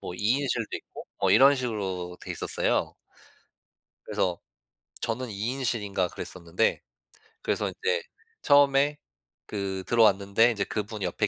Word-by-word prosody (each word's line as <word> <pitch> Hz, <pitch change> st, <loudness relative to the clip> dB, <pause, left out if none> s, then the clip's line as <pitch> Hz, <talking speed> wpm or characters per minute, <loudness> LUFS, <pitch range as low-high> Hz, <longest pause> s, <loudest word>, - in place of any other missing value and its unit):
뭐 -, -, -6 dB
2 110 Hz, +8 st, +2 dB
인실도 120 Hz, -5 st, -1 dB
있고 -, -, -11 dB
뭐 -, -, +3 dB
이런 140 Hz, +1 st, +7 dB
식으로 95 Hz, -8 st, -3 dB
돼있었어요. -, -, -1 dB, 1.1 s
그래서 90 Hz, -3 st, -1 dB, 0.6 s
저는 115 Hz, +1 st, -2 dB
2 100 Hz, -, -7 dB
인실인가 110 Hz, -8 st, -1 dB
그랬었는데 90 Hz, +5 st, -2 dB, 0.6 s
그래서 -, -, -1 dB
인제 470 Hz, +2 st, -1 dB, 0.4 s
처음에 145 Hz, 0 st, +4 dB, 0.5 s
그 95 Hz, -2 st, -3 dB
들어왔는데 105 Hz, 0 st, +4 dB
이제 105 Hz, -4 st, -1 dB
그분이 105 Hz, +1 st, -4 dB
옆에 95 Hz, +4 st, 0 dB
110 Hz, 275 characters per minute, -27 LUFS, 95-130 Hz, 1.1 s, 이런